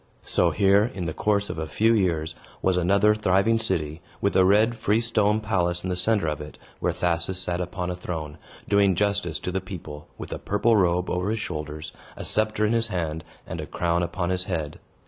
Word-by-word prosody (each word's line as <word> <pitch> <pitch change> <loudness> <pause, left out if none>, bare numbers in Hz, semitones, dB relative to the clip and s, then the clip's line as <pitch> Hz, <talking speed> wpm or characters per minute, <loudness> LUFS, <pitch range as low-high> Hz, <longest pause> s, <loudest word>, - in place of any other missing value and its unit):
So - - +2
here, 100 +2 +3
in 95 -8 -5
the 80 - -2
course 105 +2 +1
of - - -6
a 80 - -3
few 110 +7 +3
years, 85 -7 +1 0.3
was 95 - +3
another 100 +4 +4
thriving 105 +2 +2
city, 80 -7 -2 0.2
with 100 - 0
a 95 - +6
red 105 +5 +4
freestone 110 -1 +2
palace 90 -5 0
in 95 - -2
the - - 0
center 105 0 +2
of 75 -1 -2
it, 75 - -9 0.2
where - - +1
Thasus 85 +1 -1
sat 90 -1 -2
upon 90 0 -3
a - - -3
throne, 80 -4 -6 0.3
doing 100 -2 +4
justice 100 -4 0
to 90 - -3
the 95 +1 -1
people, 85 -6 -8
with - - -6
a - - -5
purple 105 +3 +2
robe 90 -2 +2
over 90 +2 -1
his 110 +1 -1
shoulders, 75 -4 -5 0.3
a - - -6
sceptre 110 0 +1
in 105 - +1
his 115 -1 +2
hand, 80 -5 -3 0.2
and - - -5
a - - -7
crown 85 0 0
upon 85 +1 -2
his 90 0 -1
head. 80 -5 -3
90 Hz, 205 wpm, -25 LUFS, 85-105 Hz, 0.3 s, a